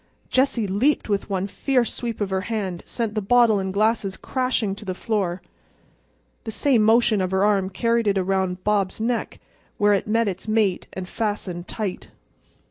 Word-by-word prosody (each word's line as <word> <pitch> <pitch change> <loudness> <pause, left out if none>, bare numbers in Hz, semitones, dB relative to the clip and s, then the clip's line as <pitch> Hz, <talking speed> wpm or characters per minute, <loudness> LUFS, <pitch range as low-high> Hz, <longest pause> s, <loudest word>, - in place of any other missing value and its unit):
Jessie 255 -4 +2
leaped 220 +10 +1
and - - -12
with 200 +1 -1
one 190 -1 -1
fierce 245 +4 0
sweep 235 -3 -4
of 200 -2 -1
her 190 0 0
hand 195 -6 -2
sent 230 -3 -2
the 215 - -1
bottle 225 0 +4
and 190 0 -2
glasses 205 -1 +1
crashing 255 -6 -1
to 205 - -9
the 185 -3 -4
floor. 185 -5 -2 1.0
The - - -6
same 245 +1 +2
motion 220 -1 +4
of 185 - 0
her 190 +1 +2
arm 195 -2 +2
carried 230 +3 0
it 200 -1 +2
around 185 -1 0
Bob's 205 -2 0
neck, 235 +1 -2 0.4
where 205 0 +4
it 200 - 0
met 225 +1 +2
its 190 +1 -4
mate 215 -4 +1
and 185 -1 -5
fastened 195 -5 -3
tight. 205 -5 -4
205 Hz, 180 wpm, -23 LUFS, 190-230 Hz, 1.0 s, bottle